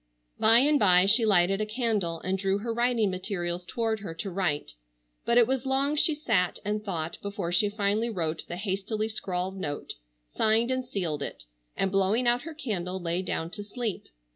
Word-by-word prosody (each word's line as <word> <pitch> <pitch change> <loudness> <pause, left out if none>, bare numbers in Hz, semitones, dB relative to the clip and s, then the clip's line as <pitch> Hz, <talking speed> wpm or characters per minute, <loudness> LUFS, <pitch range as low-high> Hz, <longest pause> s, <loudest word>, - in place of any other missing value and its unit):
By 225 +1 +7
and 290 +4 +4
by 185 -3 +6
she 220 +3 +5
lighted 195 0 +4
a - - 0
candle 215 -8 -1
and 185 +1 -1
drew 195 0 0
her 230 +3 -3
writing 235 -3 +1
materials 180 -2 -3
toward 225 0 -1
her 180 -5 -7
to 190 +4 -5
write, 175 -6 -1 0.5
but 235 - +2
it 240 - +7
was 260 +1 -1
long 275 +2 +1
she 310 +1 +3
sat 215 - +1
and 210 +1 -2
thought 170 -5 -3
before 200 -4 -4
she 190 +4 +3
finally 210 +2 0
wrote 165 -7 -2
the 175 - -5
hastily 205 +2 -2
scrawled 190 -3 -3
note, 145 -5 -4 0.4
signed 225 +3 +2
and 255 -1 -2
sealed 170 - -3
it, 140 - -6 0.3
and 195 - 0
blowing 200 +5 +2
out 240 +1 +3
her 325 0 -8
candle 190 - -3
lay 170 0 -1
down 170 -2 -3
to 205 - -7
sleep. 220 0 -4
205 Hz, 190 wpm, -27 LUFS, 180-230 Hz, 0.5 s, By